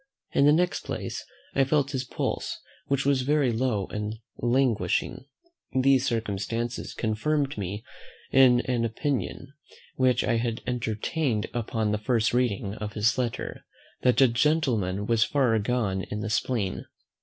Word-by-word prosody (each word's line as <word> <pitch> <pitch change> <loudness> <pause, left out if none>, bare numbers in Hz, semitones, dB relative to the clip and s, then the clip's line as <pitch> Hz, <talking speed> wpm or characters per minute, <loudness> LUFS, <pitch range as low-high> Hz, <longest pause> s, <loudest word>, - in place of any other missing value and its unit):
In 140 - +4
the - - +7
next 175 +4 +1
place, - - -4 0.3
I 135 - +4
felt 140 0 +1
his 130 -3 -2
pulse, - - -3 0.3
which 140 -1 0
was 140 -2 +3
very 140 -1 +2
low 115 -4 0
and 105 +1 -3 0.2
languishing. 125 +1 +1 0.5
These 135 0 +4
circumstances 115 0 -2
confirmed 140 +6 0
me 100 +1 -4 0.5
in 130 -2 +6
an 125 -2 -1
opinion, 135 +3 -2 0.4
which 130 -1 +3
I 120 -2 +1
had 115 -1 -2
entertained 120 +1 -1
upon 110 -2 -1
the 105 - 0
first 115 0 +1
reading 110 -5 0
of 105 -1 -6
his 115 +4 +2
letter, 120 -2 -3 0.4
that 125 -1 +3
the 135 - +7
gentleman 115 - +1
was 115 0 +3
far 125 -5 +2
gone 105 -4 0
in 105 - -3
the 105 - -3
spleen. 110 -4 -1
120 Hz, 145 wpm, -27 LUFS, 110-135 Hz, 0.5 s, the